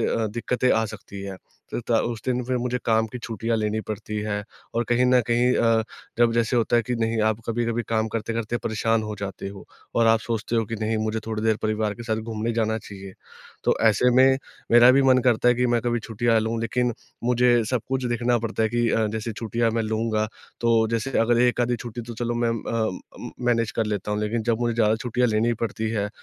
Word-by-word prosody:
ज़्यादा 115 -1 0
दिक्कतें 120 +3 0
आ 110 0 +2
सकती 100 -2 -9
है। 100 -1 -6 0.4
त - - -1
ता 115 -2 +4
उस 115 -2 -3
दिन 125 -1 0
फिर 130 +1 -1
मुझे 125 +1 -1
काम 110 -1 +2
की 125 - -5
छुट्टियाँ 115 0 -2
लेनी 110 0 -1
पड़ती 105 0 -6
है 105 -1 -2 0.3
और 120 +1 +1
कहीं 120 +1 +3
न 125 0 +5
कहीं 120 +1 +3
अ, 115 -1 +3 0.4
जब 120 -1 +4
जैसे 115 +1 +1
होता 120 0 +2
है 120 - +3
कि 125 +3 -2
नहीं 115 0 0
आप 110 0 +1
कभी-कभी 115 0 -1
काम 110 -1 +1
करते-करते 115 +1 -2
परेशान 115 0 0
हो 105 0 -4
जाते 100 0 -5
हो 100 0 -10 0.3
और 115 - +3
आप 115 0 +4
सोचते 115 0 -2
हो 115 - +2
कि 115 - -4
नहीं 110 +1 0
मुझे 110 +1 -1
थोड़ी 110 -1 -3
देर 110 -1 +2
परिवार 110 -1 0
के 120 - -9
साथ 110 -2 -1
घूमने 110 +1 -3
जाना 110 -1 0
चाहिए। 100 -3 -10 0.5
तो - - +3
ऐसे 110 +3 +4
में 130 +1 +6 0.3
मेरा 120 +1 +8
भी 135 +2 +4
मन 130 -1 +5
करता 120 0 +3
है 120 - +5
कि 125 +1 +1
मैं 120 -1 +2
कभी 120 -1 0
छुट्टियाँ 115 +1 +1
लूँ, 110 +1 -2
लेकिन 120 +2 0 0.3
मुझे 120 -1 +3
सब 125 -2 +1
कुछ 130 0 -1
देखना 120 0 +1
पड़ता 115 0 -2
है 110 - +2
कि 120 +1 +1
अ, 110 -1 +2
जैसे 110 +2 -4
छुट्टियाँ 115 +1 -1
मैं 115 0 0
लूँगा 110 0 -1 0.3
तो 115 -1 +3
जैसे 115 +3 -1
अगर 115 +1 +3
1 125 0 +2
आधी 120 0 +1
छुट्टी 120 0 -7
तो 120 +1 -8
चलो 120 +1 -2
मैं 120 0 +1
म 115 -1 -3
अ 115 - -1 0.4
उम, - - -8
मैनेज 115 -2 +2
कर 115 - 0
लेता 105 -1 -3
हूँ 105 0 -1
लेकिन 110 +2 -1
जब 115 0 0
मुझे 120 -1 0
ज्यादा 110 -1 +3
छुट्टियाँ 125 +2 0
लेनी 110 +2 +2
पड़ती 110 0 -2
है 105 -2 -1
115 Hz, 230 wpm, -24 LUFS, 110-120 Hz, 0.5 s, मेरा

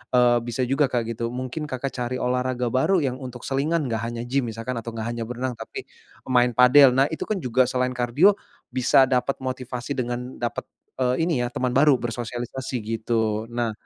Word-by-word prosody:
Eee, 120 -1 +5
bisa 120 +2 -2
juga, 135 +2 +2
Kak, 120 -2 +1
gitu. 115 +1 -3
Mungkin 130 +5 -4
Kakak, 130 +1 -3
cari 125 0 -3
olahraga 125 0 0
baru 185 +9 +3
yang 130 0 -2
untuk 125 -2 -8
selingan 150 +3 0
enggak 115 -2 -2
hanya 120 0 -5
gym 130 0 0
misalkan 115 +3 -5
atau 115 +1 -6
enggak 110 0 -3
hanya 120 -1 -3
berenang 125 +1 -3
tapi - - -7 0.4
main 125 -1 +3
padel. 130 +2 +8
Nah, 135 - +5
itu - - -3
kan 215 - 0
juga 130 -4 +2
selain 125 0 0
kardio 125 - +4 0.4
bisa 130 +1 +5
dapet 125 +1 0
motivasi 130 0 -4
dengan 125 0 -3
dapet, 120 -1 -4 0.3
eee, 125 -1 +2
ini 165 -5 +1
ya, - - 0
teman 125 +1 -2
baru 140 +2 +5
bersosialisasi 120 +2 -4
gitu. 110 0 -1
Nah 120 -1 -2
125 Hz, 185 wpm, -24 LUFS, 120-130 Hz, 0.4 s, padel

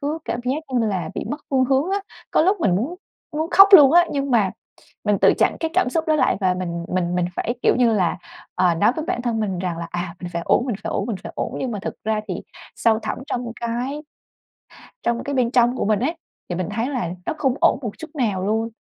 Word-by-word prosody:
cứ 300 +3 -2
cảm 240 - -3
giác 275 +5 -1
như 230 -2 +2
là 190 -4 -2
bị - - -3
mất 295 +1 -4
phương 260 -2 +3
hướng 275 +7 +1
á. 400 - +1 0.3
Có - - +3
lúc 390 +4 +2
mình 185 -4 +2
muốn 260 - -2 0.4
muốn 315 +3 -2
khóc 390 0 +8
luôn 295 -6 +9
á, 350 0 +6
nhưng 275 -1 -2
mà 215 -6 +3 0.5
mình 210 -2 +2
tự - - +6
chặn - - +2
cái 325 - -1
cảm 250 - +2
xúc 320 +4 -1
đó 310 - +3
lại, 260 -8 +2
và 185 -2 +2
mình 170 -2 -4
mình 180 -1 -1
mình 180 - +1
phải, 240 - -1
kiểu - - +3
như 240 -3 +3
là, 180 -3 +1 0.4
ờ, 175 -2 +3
nói 210 +8 +3
với 315 0 -3
bản 360 -9 -2
thân 235 -2 -1
mình 195 -5 -2
rằng 180 -3 -3
là, 170 - -5
à, 175 0 -4
mình 175 - -6
phải 170 - -2
ổn, 245 - +3
mình 240 - -2
phải - - -2
ổn, - - -1
mình 220 - -2
phải - - -7
ổn. - - -3
Nhưng 255 -3 -2
mà 205 - -4
thực - - -4
ra 215 0 0
thì 180 - -3 0.4
sâu 220 -1 +2
thẳm - - -4
trong 240 -3 -3
cái 245 +6 -3 1.0
trong 235 0 0
cái 285 -1 -3
bên 245 -2 +1
trong 245 0 +3
của - - -1
mình 210 -1 +2
ấy, 320 +7 -1 0.3
thì 175 - -2
mình 180 -1 -3
thấy 230 +5 -1
là 245 -12 -2 0.2
nó - - -1
không 265 -4 +1
ổn - - +4
một 225 -5 -3
chút 320 - -8
nào 205 -8 0
luôn. 220 +3 0
235 Hz, 260 wpm, -22 LUFS, 190-275 Hz, 1.0 s, luôn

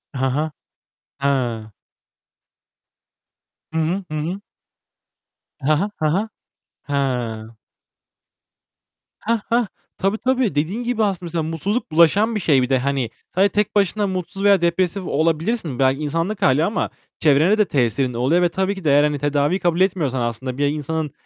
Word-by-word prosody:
Hı 130 - 0
hı. 150 +4 0 0.7
He. 120 -6 -1 2.0
Hı 160 - 0
hı. 175 +5 0
Hı 155 - -2
hı. 175 +6 -3 1.2
He 155 +2 +3
he. 175 +7 +1 0.2
He 155 - +3
he. 190 +7 +1 0.7
He. 145 - -2 2.3
Heh, 230 +2 0
heh, 235 -2 +2 0.3
tabii 195 +3 0
tabii. 255 - 0
Dediğin 175 +11 -1
gibi 235 -2 0
aslında 190 -3 -1
mesela 165 -1 -2
mutsuzluk 165 - -2
bulaşan 195 +8 +4
bir - - 0
şey 150 -8 +3
bir 125 - -1
de. 130 -2 +3
Hani 135 -3 -1 0.3
sadece 195 +2 +4
tek 210 +2 -1
başına 205 +1 +2
mutsuz 190 +1 -4
veya 200 -3 +5
depresif 180 +3 0
olabilirsin. 160 - -1
Belki 135 +2 +2
insanlık 165 +7 -2
hâli 140 0 +4
ama 205 - -1 0.3
çevrene 160 +7 +4
de 210 - +4
tesirin 125 - 0
oluyor 135 +9 +2
ve 175 - +3
tabii 190 +3 -1
ki 190 - -9
de 155 - +2
eğer 145 +1 +5
hani 150 -1 0
tedaviyi 145 +5 +1
kabul 175 0 +1
etmiyorsan 150 -10 +1
aslında 125 +2 -3
bir 145 - +2
insanın 150 +1 -2
165 Hz, 150 wpm, -21 LUFS, 140-195 Hz, 2.3 s, veya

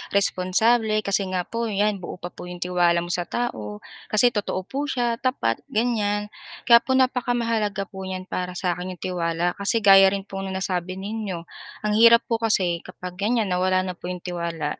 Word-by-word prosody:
responsable 215 +3 +3
kasi 200 -1 +1
nga 185 -1 -1
po 230 +4 -3
'yan 205 -1 0
buo 175 - -7
pa 175 0 -8
po - - -10
'yong 180 0 -5
tiwala 175 -1 +2
mo 175 - -5
sa 175 0 -1
tao, 105 - -4 0.2
kasi 230 +3 +4
totoo 205 -4 -2
po 275 +9 -4
siya, 240 -4 -1
tapat, 245 - 0
ganyan. 210 -2 -1 0.3
Kaya 235 -1 +7
po 260 +2 -1
napakamahalaga 235 -5 0
po 190 -1 -7
niyan 185 0 -5
para 180 0 -4
sa 180 0 -1
akin, 180 +1 -5
'yong - - -13
tiwala. 175 -1 -1
Kasi 220 +3 +2
gaya 195 -1 +8
rin 195 - -5
po 195 -1 -7
ng 190 -1 -4
nasabi 185 -1 -2
ninyo, 195 -3 -5 0.4
ang 210 - 0
hirap 230 +1 +7
po 230 -1 -2
kasi 190 -7 +2
kapag 180 0 -9
ganiyan, 215 -1 0
nawala 185 +1 +2
na 185 -1 -4
po - - -7
'yong 180 -1 -6
tiwala, 170 -4 -4
195 Hz, 190 wpm, -23 LUFS, 180-225 Hz, 0.4 s, gaya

